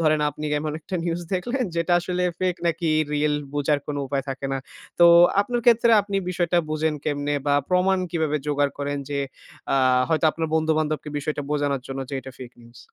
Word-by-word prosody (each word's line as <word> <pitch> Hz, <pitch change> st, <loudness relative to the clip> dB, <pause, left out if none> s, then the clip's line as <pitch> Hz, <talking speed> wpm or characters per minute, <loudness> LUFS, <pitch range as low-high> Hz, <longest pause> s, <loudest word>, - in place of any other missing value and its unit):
ধরেন 155 Hz, -1 st, +3 dB
আপনি 150 Hz, +1 st, -8 dB
এমন 150 Hz, +1 st, -1 dB
একটা 170 Hz, -, -7 dB
নিউজ 170 Hz, 0 st, -1 dB
দেখলেন 245 Hz, +8 st, -1 dB
যেটা 170 Hz, +1 st, +1 dB
আসলে 180 Hz, +1 st, -2 dB, 0.2 s
ফেক 185 Hz, -1 st, 0 dB
নাকি 170 Hz, 0 st, 0 dB, 0.2 s
রিয়েল 150 Hz, 0 st, +1 dB, 0.2 s
বোঝার 145 Hz, 0 st, +1 dB
কোন 145 Hz, -1 st, -3 dB
উপায় 135 Hz, -1 st, -2 dB
থাকে 135 Hz, +1 st, -4 dB
না। 135 Hz, -, -1 dB, 0.4 s
তো 175 Hz, -, +8 dB, 0.3 s
আপনার 240 Hz, +4 st, -1 dB
ক্ষেত্রে 235 Hz, 0 st, +5 dB
আপনি 200 Hz, 0 st, -3 dB
বিষয়টা 175 Hz, -1 st, +1 dB
বুঝেন 155 Hz, 0 st, 0 dB
কেমনে? 145 Hz, 0 st, -1 dB
বা 145 Hz, -, +3 dB
প্রমাণ 185 Hz, +1 st, +2 dB
কিভাবে 160 Hz, -3 st, 0 dB
জোগাড় 145 Hz, -1 st, +1 dB
করেন 145 Hz, 0 st, -2 dB
যে 145 Hz, -1 st, -2 dB, 0.6 s
আ -, -, +3 dB, 0.3 s
হয়তো 160 Hz, -1 st, +1 dB
আপনার 160 Hz, +1 st, -3 dB
বন্ধু-বান্ধবকে 155 Hz, -1 st, 0 dB
বিষয়টা 145 Hz, 0 st, -3 dB
বোঝানোর 145 Hz, -3 st, 0 dB
জন্য 135 Hz, 0 st, -5 dB
যে -, -, -4 dB
এটা 135 Hz, +1 st, -10 dB
ফেক 125 Hz, -2 st, -9 dB
নিউজ। 120 Hz, 0 st, -17 dB
155 Hz, 185 wpm, -24 LUFS, 145-175 Hz, 0.6 s, তো